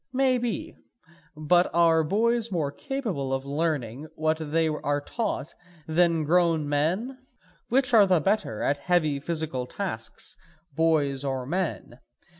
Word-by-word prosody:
Maybe; 255 -3 0 0.6
but 175 +4 +3
are 165 -1 +4
boys 230 +6 +1
more 155 -6 -1
capable 210 - -3
of 135 0 -2
learning 145 -3 -2
what 155 0 +1
they 160 +1 0
are 145 -2 -1
taught 185 - -3 0.3
then 165 0 +2
grown 165 -1 +2
men? 180 - -1 0.5
Which 255 +1 +2
are 210 -3 +7
the 180 -3 +4
better 190 - -1
at 140 - +1
heavy 155 -3 +1
physical 155 -5 -2
tasks, 115 - -4 0.4
boys 145 -3 +1
or 135 -2 -2
men? 160 -6 -3
160 Hz, 125 wpm, -26 LUFS, 145-190 Hz, 0.6 s, are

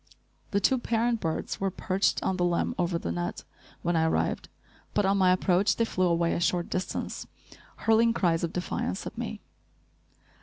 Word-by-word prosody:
The 200 - +1
two 255 +6 +3
parent 235 0 +1
birds 160 -1 -2
were 195 - +1
perched 190 +1 0
on 190 - 0
the 180 - +1
limb 175 -1 +1
over 175 -1 +1
the 85 - -3
net, 85 +1 -3 0.4
when 175 0 +1
I 160 0 +3
arrived, 160 - 0 0.5
but 205 - +3
on 195 +1 +3
my 185 -1 +5
approach 185 +1 +3
they 230 - +1
flew 185 -4 +1
away 170 0 +2
a - - -1
short 175 0 0
distance, 185 - -3 0.6
hurling 225 +1 +5
cries 175 -7 +1
of 170 - -1
defiance 175 - -3
at - - -6
me. - - -5
180 Hz, 180 wpm, -28 LUFS, 170-200 Hz, 0.6 s, my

